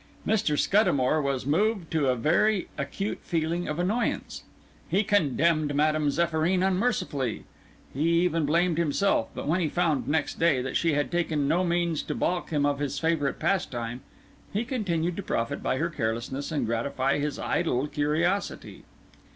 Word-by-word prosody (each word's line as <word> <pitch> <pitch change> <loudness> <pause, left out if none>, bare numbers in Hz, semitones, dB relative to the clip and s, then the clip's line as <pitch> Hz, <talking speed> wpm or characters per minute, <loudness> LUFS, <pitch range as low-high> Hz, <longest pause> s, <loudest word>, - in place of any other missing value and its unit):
Mr. 200 -9 +1
Scuddamore 155 -8 +3
was 140 -3 -2
moved 190 +4 +1
to 155 -4 +1
a 130 - +3
very 175 - +2
acute 200 +1 -3
feeling 170 +1 -1
of 150 - -3
annoyance; 205 +8 -1 0.5
he 200 - +2
condemned 160 - +2
Madame 155 0 +2
Zéphyrine 170 +4 +1
unmercifully; 180 - -1 0.5
he 150 +5 +1
even 165 -2 +1
blamed 170 +3 +2
himself; 170 - +1
but - - -5
when 165 +5 +2
he 165 -4 0
found, 165 -5 0
next 155 +2 -1
day, 165 -5 +3
that 130 +1 -4
she 165 -2 +2
had 145 0 0
taken 160 -5 0
no 170 +5 +2
means 170 -2 0
to - - -4
baulk 180 0 -1
him 145 -3 +1
of 145 -1 0
his 145 -1 -2
favourite 155 -2 0
pastime, 120 -10 -2 0.5
he 215 +4 -1
continued 180 - -1
to - - -2
profit 115 -10 -2
by 130 - 0
her 165 +4 -1
carelessness, 120 +2 -3
and 155 - 0
gratify 130 +4 0
his 145 0 -2
idle 140 -6 0
curiosity. 155 +6 -1
160 Hz, 160 wpm, -27 LUFS, 145-175 Hz, 0.5 s, Scuddamore